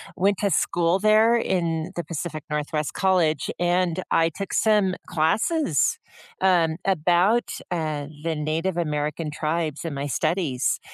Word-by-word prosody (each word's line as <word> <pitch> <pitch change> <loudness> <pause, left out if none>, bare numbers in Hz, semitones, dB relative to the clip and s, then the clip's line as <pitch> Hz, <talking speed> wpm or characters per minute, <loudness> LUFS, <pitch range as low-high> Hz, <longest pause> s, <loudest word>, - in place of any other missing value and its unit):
went 195 +1 +2
to 200 -1 +1
school 170 +2 +1
there 215 +3 +5
in 170 -7 -1
the 175 - -3
Pacific 160 0 -5
Northwest 150 0 -2
College, 175 -6 +1
and 175 0 +1
I 165 0 +3
took 195 +4 -6
some 210 -4 +3
classes, 175 - +1 0.4
um, 175 -4 +3
about, 185 +5 +2 0.2
uh, 155 -4 -2 0.2
the 165 -1 -1
Native 160 +4 -2
American 150 -1 -2
tribes 155 0 -2
and 165 -4 -4
my 140 +1 -3
studies, 155 -2 0
170 Hz, 130 wpm, -24 LUFS, 155-190 Hz, 0.4 s, there